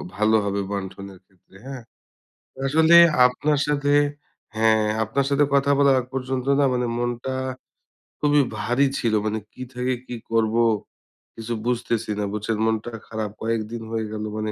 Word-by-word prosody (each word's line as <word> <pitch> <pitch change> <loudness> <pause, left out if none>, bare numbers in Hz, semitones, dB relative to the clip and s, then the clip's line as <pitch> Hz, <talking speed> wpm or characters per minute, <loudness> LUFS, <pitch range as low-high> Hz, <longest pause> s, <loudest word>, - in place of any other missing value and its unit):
ভালো 110 +2 +2
হবে 100 0 -1
বন্টনের 95 -1 -6
ক্ষেত্রে 95 -1 -27
হ্যাঁ। 135 -2 -7 0.9
আসলে 160 +4 +5 0.3
আপনার 145 +3 0
সাথে 145 -1 +1 0.6
হ্যাঁ, 110 0 +3 0.2
আপনার 130 +6 -1
সাথে 140 +1 +3
কথা 140 0 +3
বলার 140 -1 +5
আগ 125 - -5
পর্যন্ত 130 -1 -3
না 140 - +4
মানে 125 0 0
মনটা 120 +2 -3 0.8
খুবই 145 0 +3 0.2
ভারী 125 +4 +2
ছিল। 115 -3 0
মানে 110 0 -1
কি 130 - -8
থেকে 125 +1 -1
কি 120 - -6 0.2
করব 115 0 +1 0.8
কিছু 115 +1 -5
বুঝতেছি 115 -2 -1
না। - - 0
বুঝছেন 105 +1 -2
মনটা 110 +1 -1 0.2
খারাপ। 110 -2 -4
কয়েকদিন 115 0 -3
হয়ে 110 -1 -2
গেলো 110 0 -4
মানে 110 0 -2
115 Hz, 150 wpm, -23 LUFS, 110-135 Hz, 0.9 s, আসলে